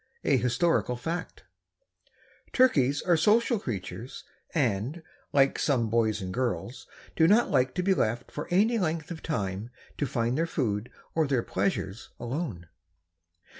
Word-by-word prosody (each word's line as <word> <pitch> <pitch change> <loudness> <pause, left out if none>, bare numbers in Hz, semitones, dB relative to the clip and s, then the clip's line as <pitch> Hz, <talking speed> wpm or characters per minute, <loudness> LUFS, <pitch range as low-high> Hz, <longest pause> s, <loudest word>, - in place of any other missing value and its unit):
A - - +3
HISTORICAL 125 +2 +1
FACT. 165 +8 -5 1.1
Turkeys 145 - +3
are 175 - +4
social 220 +7 +3
creatures 105 - -6 0.3
and, 130 - 0 0.3
like 135 -1 +3
some 120 -7 +1
boys 110 -2 +2
and 95 0 -4
girls, 120 -1 -3 0.3
do 160 - +5
not 215 +6 +4
like 130 0 +2
to 180 - 0
be 190 +1 +4
left 120 -6 -1
for 150 - -5
any 215 +6 +3
length 160 -3 -2
of 160 - -6
time 100 -6 -3 0.3
to 145 - +1
find 120 +2 0
their 165 - +1
food 115 -8 -1 0.2
or 160 -2 +2
their 130 -4 +1
pleasures 95 +2 -2
alone. 120 - -4
130 Hz, 140 wpm, -28 LUFS, 115-165 Hz, 1.1 s, do